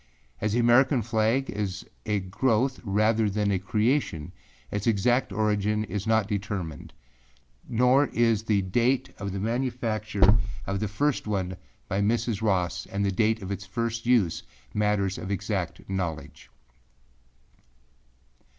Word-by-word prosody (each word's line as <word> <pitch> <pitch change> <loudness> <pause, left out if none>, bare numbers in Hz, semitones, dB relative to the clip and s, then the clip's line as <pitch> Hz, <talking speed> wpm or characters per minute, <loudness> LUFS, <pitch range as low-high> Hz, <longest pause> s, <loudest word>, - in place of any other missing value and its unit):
As 105 0 -1
the 120 - +2
American 120 +1 +4
flag 115 +4 +1
is 100 -3 -3 0.2
a 105 -2 +1
growth 120 +6 0
rather 110 +1 +2
than 105 0 0
a 95 - +1
creation, 105 - 0 0.4
its 105 +2 -2
exact 120 +4 +2
origin 105 0 +1
is 105 +1 -4
not 110 -2 +3
determined; 100 -6 -4 0.8
nor 125 +4 +4
is 115 -3 +2
the 105 -3 +1
date 120 +7 +1
of 100 -1 -3
the 100 - -3
manufacture 110 -3 +1 0.3
of 100 0 -2
the 105 - -1
first 140 +5 0
one 95 -3 -1 0.3
by 95 +2 0
Mrs. 115 0 0
Ross 95 -6 0
and 100 0 -1
the 100 - +1
date 110 +2 +1
of 95 - -5
its 100 0 -5
first 115 +2 -3
use 115 -10 +3 0.3
matters 105 -2 +1
of 95 - -6
exact 100 -3 -3
knowledge. 90 -5 -4
105 Hz, 135 wpm, -27 LUFS, 100-115 Hz, 0.8 s, American